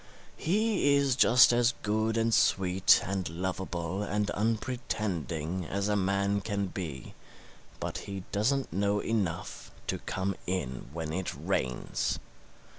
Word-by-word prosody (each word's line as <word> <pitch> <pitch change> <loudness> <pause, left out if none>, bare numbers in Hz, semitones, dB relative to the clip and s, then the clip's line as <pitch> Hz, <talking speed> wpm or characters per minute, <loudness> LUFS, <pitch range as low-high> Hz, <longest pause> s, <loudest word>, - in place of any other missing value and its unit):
He 195 -5 +2
is 140 -3 +3
just 125 -1 +7
as 120 0 +3
good 110 +2 +1
and 115 0 +2
sweet 95 -2 +4
and 95 -3 -2
lovable 90 +1 -3
and 105 0 -1
unpretending 100 - -2
as 100 +3 -2
a 105 - +1
man 100 +1 +1
can 100 -2 -1
be, 80 -8 -6 0.7
but - - -3
he 100 -2 -6
doesn't 125 - 0
know 100 +2 +1
enough 95 -6 -2 0.2
to - - -2
come 95 0 -2
in 70 -10 -3
when 80 -1 -4
it 95 +1 -2
rains. 65 -1 -1
100 Hz, 125 wpm, -30 LUFS, 90-110 Hz, 0.7 s, just